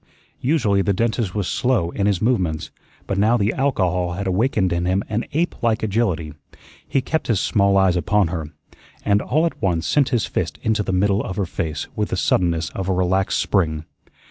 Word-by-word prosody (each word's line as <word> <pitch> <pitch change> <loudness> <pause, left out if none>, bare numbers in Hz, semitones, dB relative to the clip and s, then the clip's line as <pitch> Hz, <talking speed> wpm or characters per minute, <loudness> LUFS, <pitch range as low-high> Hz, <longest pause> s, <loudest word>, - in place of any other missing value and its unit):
Usually 120 -9 +2
the 100 +1 +1
dentist 110 -1 -1
was 100 -3 -1
slow 120 -10 +1
in 100 +2 0
his 100 -1 0
movements, 90 -10 0 0.3
but 100 - -2
now 110 +4 +4
the 105 0 +1
alcohol 90 -10 0
had 100 +3 -4
awakened 95 -1 +1
in 85 0 -1
him 95 +2 +1
an 110 +2 -1
ape 165 +5 -1
like 115 -2 +1
agility. 95 -8 0 0.5
He 135 - +1
kept 160 +4 -2
his 115 -5 +2
small 100 -1 +2
eyes 95 -2 +4
upon 90 +2 +2
her, 80 -3 -4 0.6
and 100 0 +3
all 155 +5 +1
at 170 - -3
once 85 -3 0
sent 140 - +2
his 120 -5 +1
fist - - -3
into 110 -1 +1
the 95 - -2
middle 100 +2 +2
of 95 - -5
her 100 - -1
face 80 -2 -4
with - - -1
the - - -2
suddenness 85 -2 +1
of 95 -1 -4
a - - +2
relaxed 95 +1 +1
spring. 80 -5 0
100 Hz, 195 wpm, -21 LUFS, 90-110 Hz, 0.6 s, now